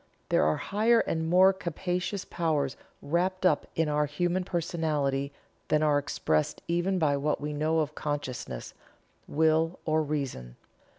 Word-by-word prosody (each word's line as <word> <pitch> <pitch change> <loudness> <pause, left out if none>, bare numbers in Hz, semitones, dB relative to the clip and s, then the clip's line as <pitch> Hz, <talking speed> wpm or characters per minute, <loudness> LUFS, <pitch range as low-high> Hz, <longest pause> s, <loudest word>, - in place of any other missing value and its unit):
There - - +3
are 75 - +2
higher 225 +3 +3
and 160 0 -2
more 185 +2 +6
capacious 180 +1 -3
powers 150 -5 -1 0.3
wrapped 185 +4 0
up 160 -5 +3
in 160 -1 +1
our 150 0 +1
human 175 +5 0
personality 155 -6 -1 0.4
than 155 0 +2
are 150 -2 +4
expressed 80 - -1
even 175 +3 +1
by 150 -5 +2
what 150 +2 0
we 150 +1 -4
know 155 +2 +1
of 150 0 -3
consciousness, 130 - -4 0.5
will, 160 +2 +2
or 155 0 +2
reason. 135 - -4
155 Hz, 140 wpm, -28 LUFS, 145-175 Hz, 0.5 s, more